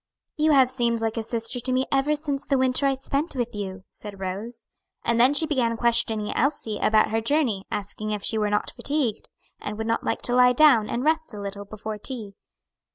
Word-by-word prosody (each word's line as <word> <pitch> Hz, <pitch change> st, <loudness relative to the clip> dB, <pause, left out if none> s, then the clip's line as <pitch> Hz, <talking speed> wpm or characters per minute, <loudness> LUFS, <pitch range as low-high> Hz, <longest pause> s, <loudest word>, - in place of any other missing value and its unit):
"You 310 Hz, 0 st, +2 dB
have 260 Hz, -2 st, +5 dB
seemed 235 Hz, -3 st, 0 dB
like 225 Hz, 0 st, -2 dB
a 225 Hz, -, -1 dB
sister 230 Hz, +2 st, -3 dB
to 255 Hz, +2 st, -3 dB
me 260 Hz, +1 st, +1 dB
ever 275 Hz, +2 st, +2 dB
since 290 Hz, -2 st, -3 dB
the 275 Hz, -, +1 dB
winter 260 Hz, +2 st, +2 dB
I 270 Hz, -, +1 dB
spent 275 Hz, +4 st, -2 dB
with 240 Hz, -2 st, -2 dB
you," 195 Hz, -2 st, -6 dB
said 205 Hz, -2 st, -8 dB
Rose. 205 Hz, +5 st, -6 dB, 0.4 s
And 235 Hz, 0 st, +1 dB
then 260 Hz, +4 st, +5 dB
she 320 Hz, -, +6 dB
began 245 Hz, -7 st, 0 dB
questioning 225 Hz, -3 st, +2 dB
Elsie 235 Hz, -6 st, -1 dB
about 215 Hz, 0 st, +3 dB
her 225 Hz, 0 st, +1 dB
journey 230 Hz, -6 st, 0 dB
asking 210 Hz, +1 st, -4 dB
if 210 Hz, -2 st, -3 dB
she 220 Hz, -, +1 dB
were 210 Hz, -1 st, +1 dB
not 210 Hz, 0 st, -1 dB
fatigued, 280 Hz, -7 st, -2 dB, 0.3 s
and 210 Hz, 0 st, -5 dB
would 220 Hz, -, -3 dB
not 230 Hz, 0 st, -1 dB
like -, -, -2 dB
to 245 Hz, -, 0 dB
lie 250 Hz, 0 st, +5 dB
down 250 Hz, -6 st, +5 dB
and 240 Hz, -, -2 dB
rest 315 Hz, -5 st, 0 dB
a -, -, -7 dB
little 200 Hz, 0 st, -6 dB
before 215 Hz, +1 st, -7 dB
tea. 220 Hz, -4 st, -7 dB
235 Hz, 215 wpm, -25 LUFS, 215-270 Hz, 0.4 s, she